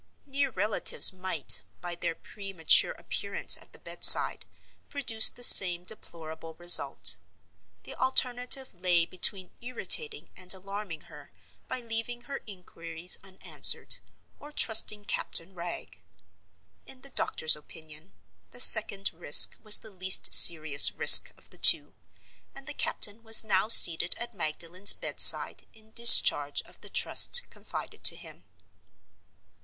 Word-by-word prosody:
Near 280 0 -8
relatives 210 -2 -1
might, 185 -6 -4 0.2
by 175 -1 -12
their 170 -1 -10
premature 195 -5 -5
appearance - - -4
at - - -15
the - - -21
bedside, - - +4 0.4
produce 230 -6 +1
the 245 - -14
same 180 -6 +7
deplorable 165 -5 -10
result. 175 +1 +2 0.7
The - - -16
alternative 255 0 -5
lay 175 -2 -5
between 185 +1 -7
irritating 435 - -2
and 185 0 -9
alarming 195 -3 -14
her 145 -1 -21 0.4
by 255 -1 -11
leaving 230 +1 -11
her 270 +3 -14
inquiries 175 -3 -7
unanswered, 190 -1 -3 0.4
or 295 - -18
trusting 215 -6 -2
Captain 180 -2 -6
Wragge. 175 -1 -13 0.9
In 260 - -16
the 275 - -16
doctor's 160 -9 -3
opinion, 155 +3 -19 0.4
the - - -15
second 200 -5 0
risk 160 -3 +3
was 215 -1 +2
the 220 - -18
least 185 -1 -3
serious 155 -4 +4
risk - - +4
of - - -22
the - - -22
two—and 275 - -3
the 290 - -12
captain 215 -5 -6
was 225 -1 +3
now 200 -2 -5
seated 170 -6 +3
at 240 0 -11
Magdalen's 175 +2 -3
bedside - - +2
in 220 0 -27
discharge 235 +1 +3
of - - -20
the - - -12
trust 485 - -1
confided - - -14
to - - +2
him. - - -16
195 Hz, 130 wpm, -22 LUFS, 170-235 Hz, 0.9 s, same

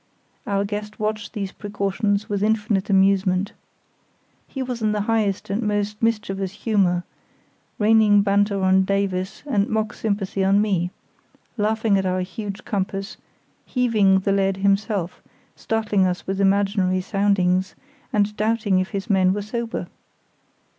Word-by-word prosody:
Our 200 0 0
guest 210 +1 -5
watched 215 -1 -3
these 200 -4 -4
precautions 205 0 -2
with 200 -1 -2
infinite 210 -2 0
amusement. 195 0 +2 0.9
He 265 - -4
was 250 -2 -5
in 215 -1 +1
the 210 - 0
highest 205 -3 0
and 205 +4 0
most 210 -1 -1
mischievous 200 -4 -1
humour, 190 -6 +1 0.7
raining 210 -1 +5
banter 200 0 +1
on 190 0 +4
Davies 195 -1 -2
and 210 -8 0
mock 220 -1 -1
sympathy 200 -2 -2
on 195 +1 +4
me, 190 -5 +1 0.7
laughing 215 -1 +1
at 190 - -1
our 185 0 0
huge 200 +2 -6
compass, 195 0 -3 0.5
heaving 215 -7 +2
the 195 - 0
lead 195 -1 +1
himself, 200 -2 0 0.3
startling 210 -4 0
us 180 0 -3
with 195 +1 -2
imaginary 195 -1 +2
soundings, 190 -2 +1 0.4
and 210 0 +1
doubting 215 -3 +1
if 185 - -2
his 200 +2 -4
men 190 -3 +3
were 205 - -3
sober. 230 +2 -4
200 Hz, 135 wpm, -22 LUFS, 195-215 Hz, 0.9 s, raining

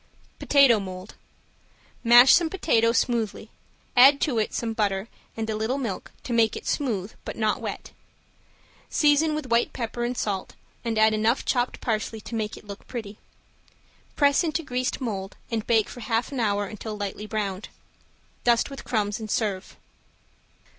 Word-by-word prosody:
~POTATO 275 -6 +5
MOLD~ 185 0 -8 0.9
Mash 240 +2 +8
some 335 -1 +4
potato 230 -11 +2
smoothly, 235 -3 -1 0.4
add 270 +3 +8
to 255 -8 +1
it 215 - -1
some 230 -1 -2
butter 200 -2 -1 0.3
and 220 -1 -2
a 220 - -2
little 220 +5 -1
milk 235 -9 -4
to 245 - -4
make 225 -2 +3
it - - -7
smooth 220 -8 -1
but - - -7
not 215 -2 0
wet. - - -6 1.0
Season 300 +1 +3
with 285 -5 -5
white 235 0 +2
pepper 240 0 -4
and 245 +1 -2
salt 195 -3 -3 0.3
and 230 -2 -2
add 220 0 +5
enough 220 +4 +1
chopped 245 -1 0
parsley 220 -1 -2
to 215 - -10
make 220 -1 -3
it - - -14
look 200 0 -10
pretty. 215 -4 -7 1.0
Press 285 +2 +3
into 330 0 -1
greased 255 -1 -2
mold 195 -5 -4
and 225 -2 -2
bake 225 -3 +3
for - - -10
half 230 +2 -1
an 270 - -4
hour 205 -2 +1
until 215 +1 -7
lightly 205 +1 -5
browned. 205 -2 -3 0.7
Dust 240 +3 +2
with 275 - -8
crumbs 210 -2 -1
and 220 -1 -7
serve. 205 -3 -2
225 Hz, 160 wpm, -25 LUFS, 210-250 Hz, 1.0 s, Mash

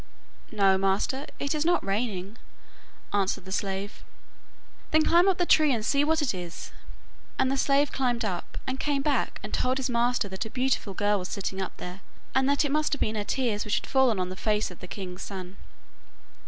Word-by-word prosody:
'No, 195 -3 +4
master, 195 +9 0
it 280 +1 -1
is 305 -1 0
not 350 +2 +2
raining,' 200 0 -2 0.7
answered 195 -2 0
the 190 - -8
slave. 195 +1 -3 0.9
'Then 315 0 +4
climb 345 +3 +5
up 380 -2 +3
the 355 - +2
tree 310 -3 +5
and 225 -4 0
see 280 +3 +3
what 315 +1 +2
it 255 - +1
is,' 175 -2 -7 0.7
and 260 - +2
the - - +1
slave 280 +1 +2
climbed 245 -3 0
up, 180 -4 -4
and 260 0 -3
came 285 -2 0
back 290 -1 0
and - - -7
told 255 +1 +1
his 265 -1 -1
master 240 -2 +1
that 190 +3 -3
a 220 - -7
beautiful 250 -5 -1
girl 205 0 +2
was 180 - -5
sitting 195 -1 -3
up 190 - -5
there, 180 +2 -7 0.3
and 265 +1 +3
that 285 +1 +3
it 285 - -1
must 305 +1 +1
have 285 - -1
been 215 - +1
her 210 -1 -2
tears 225 -3 0
which 210 - 0
had - - -1
fallen 260 -6 +3
on 180 0 -1
the 185 - -6
face 210 0 0
of 180 - -12
the 180 - -9
king's 185 -1 -6
son. 185 -1 -7
225 Hz, 210 wpm, -27 LUFS, 195-275 Hz, 0.9 s, climb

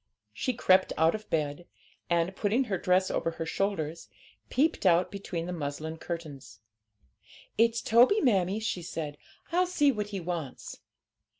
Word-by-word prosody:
She 255 - -1
crept 190 -5 +3
out 160 +1 +4
of 215 0 -7
bed, 155 +1 -2 0.4
and, 170 +2 +1
putting 220 +7 +1
her 195 -7 -2
dress 185 +1 +2
over - - 0
her 165 0 -5
shoulders, 165 - -2 0.4
peeped 300 +6 +1
out 180 -1 +4
between 190 -4 -4
the 180 - -4
muslin 155 0 -4
curtains. 145 - -7 1.0
'It's 230 +1 +2
Toby, 245 - +5
mammie,' 200 - +2
she 215 -5 -2
said; 155 -3 -5 0.4
'I'll 360 +2 +2
see 295 -5 +3
what 210 -4 -3
he 200 -2 -4
wants.' 170 -6 -5
180 Hz, 145 wpm, -29 LUFS, 165-215 Hz, 1.0 s, Toby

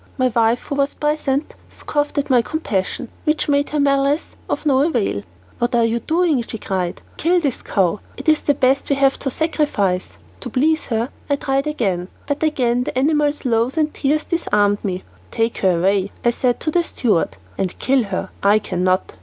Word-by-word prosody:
My 255 -1 +2
wife, 230 0 +2
who - - -5
was 280 0 0
present, 295 -1 -1 0.2
scoffed 290 0 -2
at 285 -1 0
my 245 -2 +6
compassion, 235 - -2 0.2
which 305 0 +1
made 285 0 +2
her 300 - -1
malice 280 +1 +1
of - - -2
no 270 -3 +4
avail. 240 - 0 0.4
"What 240 0 0
are 235 -1 +4
you 230 +1 0
doing?" 320 0 +1
she 230 -1 -6
cried. 185 -4 -3
"Kill 350 +3 +3
this 280 -7 -2
cow. 195 0 +1 0.2
It - - -8
is 310 -1 +5
the 290 - +2
best 265 +1 +2
we 280 - +3
have 275 0 +2
to 275 - -2
sacrifice." 250 - 0 0.2
To 245 - -6
please 310 +6 +1
her, 230 +1 -1 0.2
I 285 - +3
tried 275 0 -1
again, 195 -12 -1 0.2
but 285 0 -2
again 250 -6 +1
the - - -4
animal's 295 +1 +1
lows 235 +3 +1
and 310 -1 +1
tears 300 +2 0
disarmed 205 - +1
me. 185 -2 -3 0.3
"Take 225 0 -1
her 185 -3 +3
away," 195 +2 +1
I 240 - +5
said 245 0 0
to 310 - -1
the 345 +2 +2
steward, 180 - 0 0.2
"and 185 -2 -3
kill 260 -2 +2
her; 190 -1 -4
I 200 +2 +5
cannot." 185 -2 -1
260 Hz, 190 wpm, -20 LUFS, 210-295 Hz, 0.4 s, my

